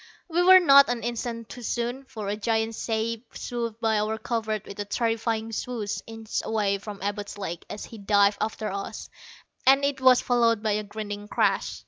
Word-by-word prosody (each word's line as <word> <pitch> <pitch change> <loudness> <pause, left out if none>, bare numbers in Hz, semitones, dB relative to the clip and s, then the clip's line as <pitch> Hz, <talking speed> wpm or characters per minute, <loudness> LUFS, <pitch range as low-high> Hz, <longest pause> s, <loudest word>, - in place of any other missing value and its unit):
We 345 0 +1
were 370 +1 +9
not 280 -6 +7
an 245 -2 -2
instant 235 -1 -4
too 245 - -9
soon. 240 +3 -3
For 220 -6 -7
a 205 - -1
giant 220 +1 0
shape 225 +1 -3
swooped 235 -2 -4
by 220 -2 +2
our 215 +1 -1
covert 220 -2 -2
with 200 - -10
a 205 - -2
terrifying 225 0 -1
swoosh, 225 -2 -3
inches 225 -1 -4
away 205 -3 0
from 205 0 -8
Abud's 205 0 -4
leg 175 -4 -5
as 210 - -6
he 225 - -11
dived 200 0 +3
after 215 -1 -2
us, 195 0 -6 0.5
and 275 +1 +5
it 280 -1 -1
was 255 -1 +7
followed 230 -3 +2
by 215 - +1
a 210 +1 0
grinding 205 0 -6
crash. - - 0
225 Hz, 185 wpm, -26 LUFS, 210-240 Hz, 0.5 s, were